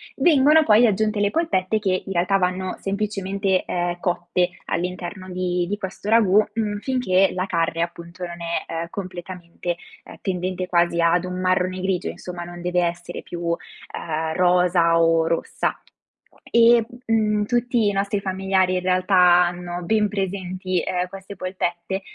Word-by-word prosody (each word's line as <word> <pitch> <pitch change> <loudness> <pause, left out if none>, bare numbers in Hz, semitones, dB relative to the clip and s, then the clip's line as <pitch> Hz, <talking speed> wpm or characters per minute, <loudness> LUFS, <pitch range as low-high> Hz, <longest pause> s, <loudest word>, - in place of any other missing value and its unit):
vengono 305 -1 +5
poi 230 -2 +5
aggiunte 215 +1 0
le 205 0 +2
polpette 220 - 0
che 190 -3 0
in 195 - -6
realtà 185 +3 +2
vanno 185 0 -1
semplicemente, 195 -1 -1
ehm, 175 0 -2
cotte 180 0 0 0.2
all'interno 180 +2 -4
di 180 -1 -1
di 205 - -2
questo 195 0 -7
ragù, 215 -2 +5
mhmm, 210 -2 -1
finché 200 -7 +2
la 185 0 -1
carne 165 -1 0
appunto 170 +1 -5
non 170 0 -8
è, 170 0 -2
ehm, 165 +1 -3
completamente, 175 -2 -6 0.3
ehm, - - -11
tendente 185 -1 -2
quasi 170 -1 +2
ad 170 +1 +3
un 180 0 -5
marrone 185 0 0
grigio, 190 -2 -1
insomma, 175 -1 -7
non 175 0 -9
deve 180 0 0
essere 175 0 -4
più, 175 0 -7
uhm, 170 0 0 0.8
rosa 180 -2 +3
o 165 0 +3
rossa. 165 - -1 0.7
E, 235 -1 +5 0.2
mhmm, 215 -2 +1
tutti 240 -1 +1
i - - +2
nostri 200 +1 -1
familiari 190 -1 0
in 180 - +1
realtà 185 +1 +1 0.3
hanno 175 0 -4
ben 210 +3 +2
presenti, 185 -2 -2
ehm, 180 0 -2
queste 195 +1 -10
polpette, 185 0 -3
185 Hz, 150 wpm, -22 LUFS, 175-200 Hz, 0.8 s, vengono